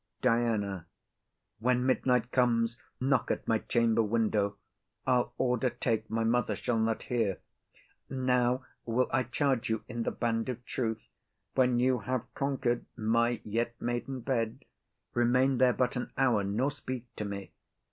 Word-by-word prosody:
DIANA. 110 -7 +1 0.7
When 125 +2 +2
midnight 125 -2 +2
comes, 120 -2 +2 0.2
knock 130 -1 +2
at - - -2
my 110 -1 +3
chamber 115 -1 +2
window; 105 -2 +1 0.5
I'll 125 -2 +2
order 125 0 +2
take 115 -2 -1
my 115 0 0
mother 120 +2 +1
shall 115 -2 0
not 110 0 0
hear. 110 -6 0 0.7
Now 125 -1 +1 0.2
will 120 +2 +1
I 135 - +4
charge 125 -1 0
you 110 -1 -1
in 120 -1 -4
the - - 0
band 115 +1 -1
of 125 -1 -5
truth, 110 -3 -3 0.5
When 125 -2 +3
you 125 0 +3
have 125 +3 -3
conquer'd 130 -3 -1
my 115 +1 +1
yet 115 +2 -2
maiden 120 +2 -3
bed, 115 -3 -1 0.5
Remain 125 +2 +3
there 125 -1 +5
but 125 +2 0
an 125 - -3
hour, 125 -6 +3
nor 110 +8 0
speak 130 -3 -6
to - - -2
me. 100 -1 -6
120 Hz, 145 wpm, -30 LUFS, 115-125 Hz, 0.7 s, there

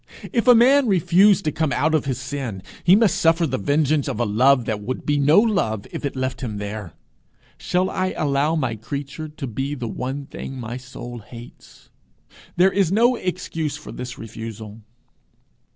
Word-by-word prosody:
If 235 0 +1
a 245 - +9
man 260 +3 +5
refuse 195 +1 +4
to 155 - 0
come 155 -2 -1
out 155 +3 +1
of 155 - +1
his 130 -4 -2
sin, 130 -7 -5 0.2
he 180 - +6
must 210 -4 +3
suffer 165 +1 +3
the 130 -6 -2
vengeance 145 +5 +1
of 125 -5 -3
a 120 - +2
love 125 +4 +3
that 105 -2 -2
would 125 +5 -5
be 145 -1 +1
no 150 +6 +5
love 195 - 0
if - - -6
it 140 - -3
left 130 -1 -3
him 110 -5 -4
there. 100 -4 -6 0.7
Shall 180 +1 0
I 185 0 -2
allow 145 +2 +1
my 130 -7 -1
creature 140 +7 -6
to 150 -1 -7
be 135 +4 -3
the 130 +3 -4
thing 135 -1 -7
my 120 0 -5
soul 125 -1 -9
hates?' 115 +2 -14 0.6
There 185 +2 +4
is 190 -4 +1
no 235 +5 +4
excuse 165 -7 -3
for 150 - -10
this 125 0 -7
refusal. 110 -1 -8
140 Hz, 180 wpm, -22 LUFS, 120-165 Hz, 0.7 s, a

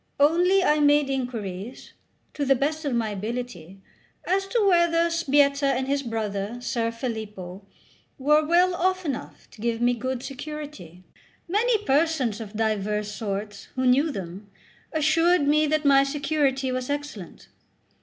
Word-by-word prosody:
Only 355 +6 +4
I 300 -3 +3
made 290 -1 +4
inquiries, 235 -4 -5 0.4
to 290 - -3
the 270 -1 +4
best 305 +4 -2
of 280 - -1
my 225 -2 0
ability, 205 -4 -6 0.5
as 390 +2 0
to 445 0 +1
whether 340 -2 +3
Sbietta 285 -3 +2
and 260 +1 -2
his 280 0 0
brother 220 -2 -3
Ser 235 -2 -1
Filippo 210 -6 -6 0.5
were 300 +2 +3
well 350 +3 +3
off 370 +1 0
enough 275 -6 -5
to 210 - -14
give 230 0 -1
me 245 +1 +3
good 255 +1 -4
security. 275 - -8 0.4
Many 430 +3 +1
persons 270 -6 +1
of 210 -2 -8
divers 210 -1 -1
sorts, 205 -1 -5
who 260 0 -1
knew 270 +5 +4
them, 195 -1 -7 0.4
assured 315 +1 +3
me 305 +1 +3
that 310 0 0
my 275 -1 +6
security 275 -2 0
was 255 0 -3
excellent. 285 - -6
270 Hz, 145 wpm, -25 LUFS, 220-305 Hz, 0.5 s, my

